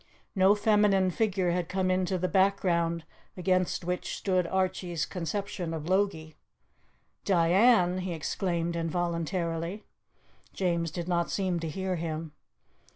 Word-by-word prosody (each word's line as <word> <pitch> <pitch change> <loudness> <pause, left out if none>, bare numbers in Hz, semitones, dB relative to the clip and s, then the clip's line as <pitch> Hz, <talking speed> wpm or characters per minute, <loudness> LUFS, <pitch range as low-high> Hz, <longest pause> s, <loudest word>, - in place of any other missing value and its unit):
No 195 +1 +5
feminine 205 -3 +3
figure 190 -3 0
had 175 -1 -1
come 185 -1 0
into 185 0 0
the 185 +1 0
background 175 -4 +1 0.3
against 185 -1 0
which 180 +1 -3
stood 185 -3 0
Archie's 180 -3 -1
conception 180 -1 -4
of 155 0 -6
Logie. 185 -5 0 0.9
"Diane?" 185 +1 +4
he 185 0 -3
exclaimed 170 +1 -2
involuntarily. 170 +2 -2 0.7
James 170 -3 0
did 170 +1 -5
not 170 -1 0
seem 185 -3 -1
to 165 -1 -4
hear 190 +2 -2
him. 160 -1 -4
180 Hz, 120 wpm, -29 LUFS, 170-190 Hz, 0.9 s, No